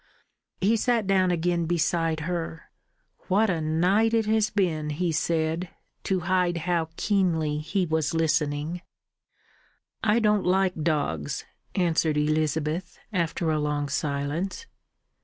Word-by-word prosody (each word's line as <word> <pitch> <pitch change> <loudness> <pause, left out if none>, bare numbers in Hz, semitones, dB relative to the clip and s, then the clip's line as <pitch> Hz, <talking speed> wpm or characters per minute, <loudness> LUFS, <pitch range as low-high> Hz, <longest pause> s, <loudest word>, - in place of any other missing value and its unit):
He 215 +4 +3
sat 235 -1 +1
down 190 -1 +3
again 175 -1 0
beside 165 -1 0
her. 165 -1 -4 0.6
"What 205 +2 +3
a 165 -3 -1
night 185 +9 +2
it 225 -1 +2
has 220 0 +2
been!" 165 -7 0
he 165 +3 -1
said, 165 +2 0 0.4
to 190 -2 0
hide 180 -1 +1
how 170 -3 0
keenly 165 -7 +1
he 180 +5 -1
was 160 -1 0
listening. 155 +1 0 1.2
"I 215 0 +3
don't 210 -3 +3
like 185 0 +2
dogs," 145 - -1 0.3
answered 165 -4 +2
Elizabeth, 155 +3 0 0.2
after 170 -2 0
a 155 - +1
long 150 -1 -1
silence. 145 - -2
170 Hz, 120 wpm, -26 LUFS, 155-185 Hz, 1.2 s, He